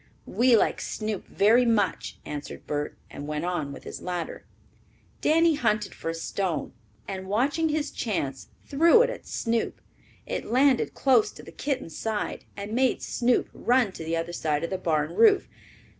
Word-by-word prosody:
"We 245 -1 +4
like - - +1
Snoop 215 -3 -4
very 225 +5 +4
much," 225 -5 0
answered 145 -1 -7
Bert, 145 0 -3
and 145 - -7
went 150 +2 -2
on 165 -6 -2
with 140 - -9
his - - -8
ladder. 175 -2 -4 0.8
Danny 330 +1 +4
hunted 215 -8 0
for - - -5
a 165 - -2
stone, 165 -2 -2 0.3
and 190 -1 -5
watching 280 +10 +1
his 300 -1 -1
chance 140 - -3 0.2
threw 335 - +6
it - - 0
at - - -9
Snoop. 230 -1 -1 0.5
It - - -3
landed 260 +2 +3
close 245 -6 +4
to - - -12
the - - -11
kitten's 260 - -3
side 220 -2 -3
and 200 +2 -5
made 255 +1 +2
Snoop 245 0 +1
run 245 -4 +2
to 165 - -8
the 165 +1 -1
other 165 +1 -3
side 155 -2 -1
of 170 - -3
the 190 - -2
barn 155 -2 0
roof. 405 - +5
210 Hz, 170 wpm, -26 LUFS, 165-255 Hz, 0.8 s, threw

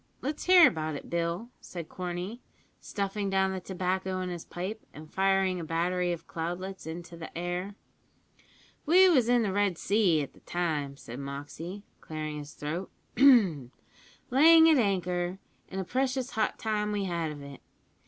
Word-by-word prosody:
Let's 295 +3 -4
hear 360 -4 +8
about 155 - -2
it, - - -9
Bill," 170 +6 -2
said 170 -3 -8
Corney, 180 +6 -5 0.4
stuffing 200 0 -3
down 190 0 +2
the 190 - -3
tobacco 185 0 -2
in 185 - -3
his 175 -2 -5
pipe, 190 +5 -5
and 155 +1 -12
firing 195 -1 +2
a - - -4
battery 175 +2 0
of 170 -1 -5
cloudlets 175 +3 -5
into 170 +1 -7
the 165 0 -8
air. 175 +3 -3 1.1
"We 370 +4 +7
was 255 -9 +4
in 245 -1 +4
the 195 -3 -1
Red 200 -3 +1
Sea 190 -8 +2
at 140 - -9
the - - -19
time," 150 -6 -2
said 120 -1 -9
Moxey, 145 +8 -7 0.2
clearing 155 -1 -5
his 145 0 -9
throat, 165 +6 -4 0.3
"layin' 210 - +5 1.0
at 310 - +5
anchor, 180 -3 0 0.3
and 190 - -4
a - - -1
precious 260 +4 -1
hot 220 -2 0
time 210 -1 -1
we 205 -1 -1
had 170 -3 -2
of 145 -1 -9
it. 140 -1 -10
180 Hz, 165 wpm, -29 LUFS, 165-205 Hz, 1.1 s, hear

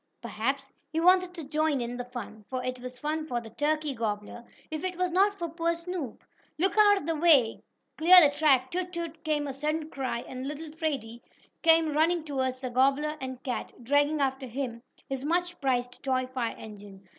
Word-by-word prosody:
Perhaps 265 +4 -3 0.2
he 320 - -1
wanted 365 +1 +4
to 330 - -6
join 300 0 0
in 240 0 -3
the 245 0 -5
fun, 245 -3 -8
for 255 -1 -3
it 255 0 -3
was 250 0 -7
fun 310 +3 -3
for 245 -5 -1
the 225 -2 -11
turkey 305 0 0
gobbler, 225 0 -4 0.3
if 310 +1 -4
it 365 -1 -3
was 365 -1 0
not 400 +3 +3
for 340 - -3
poor 335 +1 -1
Snoop. 335 -7 -6 0.3
"Look 380 +5 +2
out 410 -5 +5
the 330 0 0
way! 295 -8 +4 0.4
Clear 360 +3 +10
the 290 -4 +5
track! 265 -5 +3
Toot! 360 0 -2
Toot!" 335 -2 -6
came 300 -2 0
a 275 - -4
sudden 305 +3 -2
cry 255 -3 -3
and 260 +1 -6
little 300 +2 -6
Freddie 265 -8 -3 0.4
came 325 -2 +4
running 325 +2 +2
toward 265 -4 -1
the 255 -1 -6
gobbler 275 +4 +2
and 260 -1 -6
cat, 255 -3 -4
dragging 290 +4 +2
after 265 -1 -1
him 240 -1 -4 0.3
his 270 -1 -4
much 350 +2 -1
prized 245 -2 -1
toy 260 -2 0
fire 255 -2 -3
engine. 200 -2 -12
285 Hz, 190 wpm, -28 LUFS, 255-325 Hz, 0.4 s, Clear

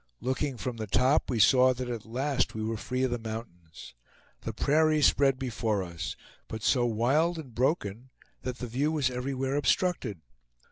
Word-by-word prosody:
Looking 130 +1 -2
from 120 0 -4
the 110 -1 -4
top, 125 +8 +2
we 125 - 0
saw 130 +3 +5
that 125 0 -4
at 115 -3 -5
last 130 +2 -1
we 110 - -3
were 115 +1 -1
free 125 +4 -2
of 130 - +1
the 120 - -1
mountains. 100 - -8 0.5
The 115 - -4
prairie 155 +6 +2
spread 135 -1 +4
before 110 -6 -1
us, 85 -2 -5 0.3
but 110 -1 -6
so 120 -3 +3
wild 135 +10 +2
and 140 -7 -8
broken 125 - -1 0.3
that 125 -1 -4
the 125 - -5
view 135 +6 0
was 145 -5 +1
everywhere 130 +2 -2
obstructed. 145 - 0
125 Hz, 175 wpm, -29 LUFS, 110-135 Hz, 0.5 s, saw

